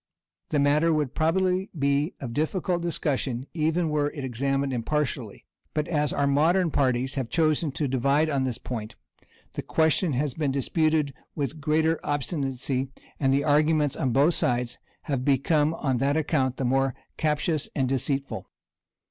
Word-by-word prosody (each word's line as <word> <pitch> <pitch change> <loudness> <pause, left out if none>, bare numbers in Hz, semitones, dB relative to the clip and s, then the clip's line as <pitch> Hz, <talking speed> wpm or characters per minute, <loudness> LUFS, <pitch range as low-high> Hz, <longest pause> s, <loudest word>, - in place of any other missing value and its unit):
The 150 - 0
matter 145 +3 +3
would 150 -4 0
probably 185 +4 +1
be 140 +3 +1
of 120 -4 -5
difficult 175 +4 0
discussion, 135 -6 -1
even 160 +1 +1
were 150 -1 +1
it 145 -2 -7
examined 135 +2 -1
impartially; 140 +4 -2 0.3
but 150 -1 0
as 150 -3 +1
our 140 - +1
modern 160 +5 +3
parties 130 -1 +1
have 130 -4 -3
chosen 155 -2 +1
to 145 - -1
divide 140 +4 +2
on 140 -3 0
this 125 -3 -2
point, 110 -4 -6 0.6
the - - -3
question 160 +1 +1
has 140 +1 0
been 150 0 -1
disputed 150 +2 +1 0.2
with 140 -2 -1
the 160 - -14
greater 155 +2 +1
obstinacy, 135 -3 -2 0.3
and 135 -2 +2
the 140 +1 +2
arguments 150 -1 +3
on 130 - 0
both 140 +7 +4
sides 120 -3 0 0.2
have 135 -3 -2
become, 145 +3 +2
on 135 -5 0
that 140 +4 +1
account, 135 -5 0
the 135 - -1
more 135 0 +1 0.2
captious 155 0 0
and 135 -3 +1
deceitful. 135 +1 -2
145 Hz, 155 wpm, -26 LUFS, 135-155 Hz, 0.6 s, both